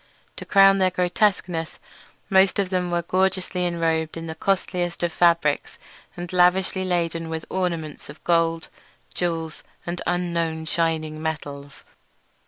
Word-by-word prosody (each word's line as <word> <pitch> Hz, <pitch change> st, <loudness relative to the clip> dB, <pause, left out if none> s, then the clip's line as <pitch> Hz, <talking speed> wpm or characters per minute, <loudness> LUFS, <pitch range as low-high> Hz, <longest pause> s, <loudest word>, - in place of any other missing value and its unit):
To -, -, -7 dB
crown 195 Hz, 0 st, +6 dB
their 185 Hz, -1 st, +4 dB
grotesqueness, 180 Hz, -2 st, 0 dB, 0.5 s
most 190 Hz, 0 st, +4 dB
of 195 Hz, -2 st, 0 dB
them 180 Hz, -1 st, 0 dB
were 175 Hz, 0 st, 0 dB
gorgeously 185 Hz, 0 st, 0 dB
enrobed 165 Hz, -2 st, -1 dB
in 165 Hz, -, -6 dB
the 160 Hz, -, -5 dB
costliest 175 Hz, 0 st, -1 dB
of 170 Hz, -2 st, 0 dB
fabrics, 165 Hz, -4 st, +2 dB, 0.4 s
and 175 Hz, +1 st, -6 dB
lavishly 185 Hz, +1 st, +3 dB
laden 170 Hz, -2 st, -1 dB
with 160 Hz, 0 st, -4 dB
ornaments 170 Hz, -5 st, -3 dB
of 155 Hz, -, -12 dB
gold, 165 Hz, -1 st, +1 dB, 0.5 s
jewels, 165 Hz, -3 st, -3 dB, 0.2 s
and 175 Hz, +1 st, -4 dB
unknown 170 Hz, -2 st, -1 dB
shining 160 Hz, -1 st, -1 dB
metals. 145 Hz, -3 st, -5 dB
170 Hz, 130 wpm, -24 LUFS, 160-180 Hz, 0.5 s, crown